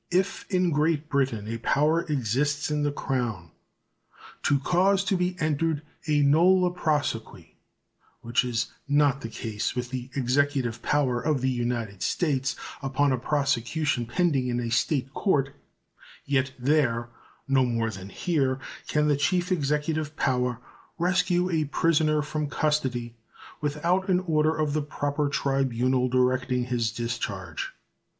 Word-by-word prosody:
If 185 +2 0
in 180 -2 +2
Great 155 0 +1
Britain 130 -7 0
a 115 +1 -4
power 150 +7 +2
exists 145 +4 0
in 150 0 0
the 145 0 +1
Crown 115 - -3 0.9
to 145 - +3
cause 185 +7 +2
to 195 - +1
be 180 0 0
entered 155 -1 0 0.2
a 150 -1 +3
nolle 180 +5 +4
prosequi, 120 - -2 0.7
which 120 +5 +1
is 120 -1 -2 0.2
not 145 -1 +3
the 115 - -5
case 110 -2 -3
with 125 0 -3
the 130 -1 -5
Executive 130 -2 +1
power 130 -5 +1
of 150 -4 0
the 130 0 +1
United 120 -5 -2
States 135 -6 0 0.3
upon 140 +1 +1
a 130 - +2
prosecution 140 -1 0
pending 140 -2 +1
in 120 -1 -1
a 120 -1 -3
State 135 +2 0
court, 140 -9 +1 0.7
yet 140 -1 +1
there 125 -3 +1 0.4
no 135 -1 +4
more 115 -2 0
than 95 -1 -8
here 135 - 0 0.3
can 150 0 +1
the 145 - +3
chief 175 +6 0
executive 150 -1 0
power 125 -3 0 0.4
rescue 180 0 +2
a 160 -2 +1
prisoner 155 0 +2
from 150 0 -3
custody 130 -7 -1 0.5
without 170 +6 0
an 180 -1 +3
order 155 -3 +1
of 155 -2 0
the 155 - +1
proper 145 0 -2
tribunal 130 -2 +1
directing 125 0 +1
his 120 -3 -1
discharge. 105 -7 -4
140 Hz, 140 wpm, -26 LUFS, 125-155 Hz, 0.9 s, nolle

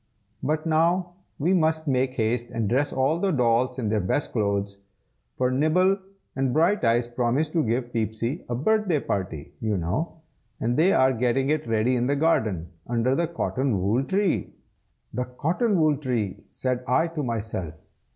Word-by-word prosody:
But 155 +1 -1
now 170 +3 +2 0.2
we 170 +6 +1
must 160 -2 +1
make 130 -1 +1
haste 120 +1 0
and 115 -2 -2
dress 135 +6 +1
all 135 +5 +1
the 195 - +1
dolls 125 -3 +2
in 115 -5 -1
their 110 0 +1
best 100 +9 -1
clothes, 100 -2 -1 0.6
for 125 0 +1
Nibble 180 +8 +3 0.4
and 135 -1 0
Brighteyes 140 - +3
promised 125 +6 0
to 165 -3 +2
give 120 +2 -1
Peepsy 115 - -2
a 120 - -1
birthday 190 - +2
party, 90 - -4
you 110 -2 -1
know, 105 - -3 0.4
and 120 +1 0
they 170 +7 +4
are 130 -6 +4
getting 125 +3 +1
it 155 -4 -1
ready 115 +3 +2
in 125 0 +1
the 140 - +2
garden, 110 - +1 0.2
under 120 +2 +1
the 170 +4 +1
cotton 135 - -1
wool 105 +8 +1
tree." 195 +5 0 0.6
"The 125 - -1
cotton 170 - 0
wool 155 -2 +4
tree!" 120 -9 -3
said 125 -1 -2
I 130 +7 +3
to 165 -2 -4
myself. 110 - -3
130 Hz, 165 wpm, -25 LUFS, 115-155 Hz, 0.6 s, they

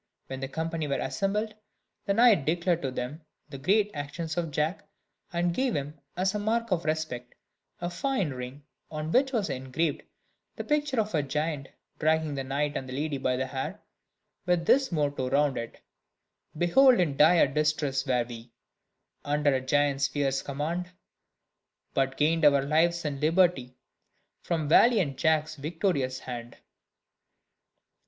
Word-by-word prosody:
When 135 0 -6
the 135 - -3
company 160 +2 -3
were 140 - 0
assembled, 210 +2 -1 0.5
the 200 - +2
knight 230 - +5
declared 170 +2 +1
to 135 - -1
them 130 +5 -5 0.3
the 135 -2 -8
great 205 +8 +2
actions 155 +3 -5
of 170 -2 -1
Jack, 150 +5 -1 0.5
and 175 0 0
gave 260 +3 0
him, 145 +2 -4 0.2
as 190 +2 +1
a 210 - -1
mark 230 +2 -1
of 170 -3 0
respect, 155 -6 -3 0.4
a 175 - -2
fine 185 - -1
ring, 130 +2 -7 0.3
on 155 0 -4
which 265 +4 +3
was 225 -6 0
engraved 135 +4 -2 0.5
the - - -5
picture 295 -4 0
of 215 -1 0
the 155 - +1
giant 150 0 -3 0.3
dragging 155 -1 +1
the 135 -1 -3
knight 145 +2 -1
and 130 - -4
the - - -6
lady 145 +1 -2
by 130 -1 0
the 130 +1 -1
hair, 130 0 -5 0.7
with 175 -2 +2
this 270 +3 +3
motto 145 -5 -1
round 145 -1 +2
it: 115 0 -6 0.8
"Behold 245 - +5
in 160 -6 +1
dire 160 +4 +6
distress 145 -1 0
were 125 -2 +2
we, 115 0 -10 0.7
Under 145 0 +1
a 130 - 0
giant's 140 +1 +2
fierce 135 -1 -1
command; 160 +6 -3 1.0
But 135 0 0
gained 160 +2 +2
our 140 -2 +5
lives 165 +4 +2
and 140 -1 -3
liberty 160 -6 +2 0.7
From 160 -3 -2
valiant 170 - +4
Jack's 155 0 +1
victorious 145 -4 -1
hand." 120 -1 -7
150 Hz, 150 wpm, -28 LUFS, 135-175 Hz, 1.0 s, dire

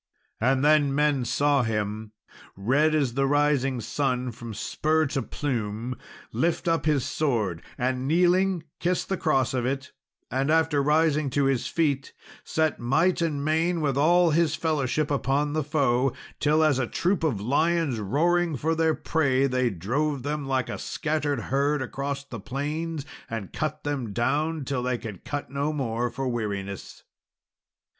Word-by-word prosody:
And 130 +4 +2
then 150 -2 +4
men 145 -3 +2
saw 145 +3 +2
him, 105 -1 -2 0.4
"red 145 +10 +2
as 140 -6 +1
the 135 +1 +1
rising 140 -3 +2
sun 125 +1 -1
from 115 -1 -8
spur 155 +8 +1
to 135 -1 -1
plume," 120 -2 -3 0.4
lift 170 +1 0
up 165 -3 +1
his 145 -5 +2
sword, 110 - -1 0.2
and, 130 +1 -1
kneeling, 180 +2 +3 0.2
kiss 180 +1 0
the 190 - -1
cross 135 -9 +1
of 125 -2 0
it; 135 +2 -2 0.4
and 135 +3 0
after, 160 -2 +3
rising 150 0 +2
to 140 +2 +1
his 135 -3 +1
feet, 145 -5 0 0.3
set 155 -1 0
might 165 +10 +2
and 145 -4 -1
main 165 +3 +1
with 145 -4 0
all 170 +4 +4
his 160 -1 +2
fellowship 150 -2 0
upon 145 +1 0
the 155 0 0
foe, 135 -3 +1 0.3
till, 155 +1 +3
as 150 -4 +3
a 125 - 0
troop 180 - 0
of 140 -11 +1
lions 145 +3 +1
roaring 165 - +1
for 160 +5 0
their 160 -1 +2
prey, 135 -4 +1
they 130 -2 +1
drove 130 - -1
them 145 0 -3
like 130 -3 0
a - - -5
scattered 150 -2 -1
herd 140 +2 +1
along 140 +2 -3 0.2
the 115 - -5
plains, 150 +6 -3 0.2
and 110 -4 -5
cut 155 -1 -3
them 135 -8 -3
down 150 +7 0
till 130 -1 -1
they 125 0 -1
could 105 -6 -8
cut 145 -1 -5
no 140 +2 -1
more 120 -4 -1
for 135 +3 -4
weariness. 100 -5 -4
140 Hz, 160 wpm, -26 LUFS, 125-155 Hz, 0.4 s, then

